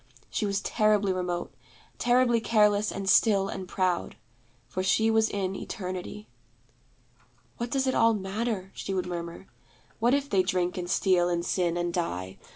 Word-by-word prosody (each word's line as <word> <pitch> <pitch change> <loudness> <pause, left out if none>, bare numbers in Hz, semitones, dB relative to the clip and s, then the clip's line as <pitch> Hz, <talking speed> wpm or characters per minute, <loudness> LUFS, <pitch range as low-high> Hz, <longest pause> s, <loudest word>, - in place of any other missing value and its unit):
She 210 - -1
was 200 0 -1
terribly 210 -3 +2
remote; 180 -1 -3 0.5
terribly 240 -1 +3
careless 210 -2 +3
and 195 0 -5
still 195 0 +4
and 190 -1 -6
proud; 185 -1 -1 0.5
for 185 - -3
she 220 +4 +2
was 220 0 +3
in 195 -1 -2
Eternity. 185 +2 -6 1.3
'What 235 0 -3
does 270 +2 0
it 260 - +1
all 230 0 +4
matter?' 195 0 -3
she 195 - -4
would 185 - -1
murmur. 170 0 -6 0.5
'What 240 +4 +3
if 280 0 -1
they 195 -8 +3
drink 180 -1 -1
and 175 -1 -4
steal 180 -2 +2
and 170 -1 -1
sin 175 -2 0
and 175 0 -1
die? 95 - -3
195 Hz, 160 wpm, -27 LUFS, 180-220 Hz, 1.3 s, still